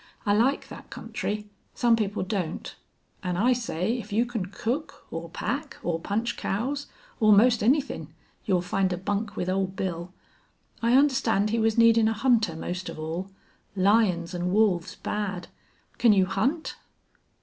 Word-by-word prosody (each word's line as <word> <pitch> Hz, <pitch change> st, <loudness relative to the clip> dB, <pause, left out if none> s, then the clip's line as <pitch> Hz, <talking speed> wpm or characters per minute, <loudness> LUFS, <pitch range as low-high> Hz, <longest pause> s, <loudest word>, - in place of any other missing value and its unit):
"I 205 Hz, -, +3 dB
like 245 Hz, +7 st, +2 dB
thet -, -, -12 dB
country. 210 Hz, 0 st, -4 dB, 0.3 s
Some 235 Hz, -1 st, +4 dB
people 210 Hz, -3 st, -1 dB
don't. 185 Hz, -4 st, -3 dB, 0.5 s
An' 180 Hz, -2 st, -2 dB
I 245 Hz, +6 st, +4 dB
say 230 Hz, -1 st, -1 dB
if 215 Hz, -1 st, -9 dB
you 225 Hz, +4 st, +2 dB
can 230 Hz, -6 st, -3 dB
cook 245 Hz, +10 st, -4 dB
or 165 Hz, +1 st, -5 dB
pack 275 Hz, -, -4 dB
or 165 Hz, -2 st, -1 dB
punch 215 Hz, +7 st, -2 dB
cows 270 Hz, +8 st, -2 dB, 0.3 s
or 215 Hz, -1 st, +5 dB
'most 230 Hz, +3 st, +5 dB
anythin' 270 Hz, +6 st, +1 dB, 0.3 s
you'll 185 Hz, -3 st, +1 dB
find 190 Hz, +1 st, 0 dB
a 180 Hz, -, -1 dB
bunk 205 Hz, +3 st, -2 dB
with 180 Hz, -, -2 dB
Old 190 Hz, 0 st, -1 dB
Bill. 180 Hz, -2 st, -3 dB, 0.7 s
I 235 Hz, +1 st, +3 dB
understand 255 Hz, -7 st, +3 dB
he 230 Hz, -, +1 dB
was 225 Hz, 0 st, +2 dB
needin' 230 Hz, -1 st, +6 dB
a 225 Hz, -, +2 dB
hunter 225 Hz, -6 st, +2 dB
most 180 Hz, +3 st, -4 dB
of -, -, -7 dB
all. 165 Hz, +5 st, -4 dB, 0.5 s
Lions 190 Hz, -3 st, +2 dB
an' 180 Hz, 0 st, -1 dB
wolves 195 Hz, -5 st, +2 dB
bad! 205 Hz, -4 st, -4 dB, 0.5 s
Can 230 Hz, -3 st, +6 dB
you 190 Hz, -2 st, +4 dB
hunt?" 255 Hz, -, -1 dB
210 Hz, 160 wpm, -26 LUFS, 185-230 Hz, 0.7 s, needin